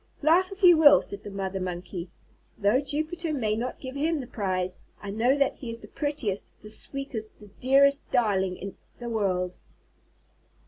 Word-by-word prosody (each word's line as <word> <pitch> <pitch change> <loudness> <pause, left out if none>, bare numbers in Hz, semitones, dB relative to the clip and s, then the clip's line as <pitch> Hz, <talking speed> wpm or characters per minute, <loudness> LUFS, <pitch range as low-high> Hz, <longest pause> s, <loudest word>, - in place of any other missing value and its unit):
"Laugh 355 +5 +4
if 390 +1 -10
you 350 -1 +9
will," 295 -2 +8
said 200 - -7
the 205 - -7
Mother 195 -1 -3
Monkey. 180 -1 -5 0.5
"Though 205 +5 +3
Jupiter 315 +4 -2
may 220 -8 0
not 245 +3 -3
give 260 0 -7
him 310 +2 0
the 260 - -5
prize, 185 -5 -2 0.2
I 200 - -6
know 240 +6 +2
that 275 -1 +1
he 250 - -7
is 230 - -4
the - - -13
prettiest, 285 -10 -2
the 210 - -9
sweetest, 240 -2 -5
the 210 -2 -14
dearest 280 +2 +4
darling 190 -6 +1
in 195 0 -7 0.2
the 240 -1 -6
world." 185 -4 -1
230 Hz, 175 wpm, -27 LUFS, 195-285 Hz, 0.5 s, you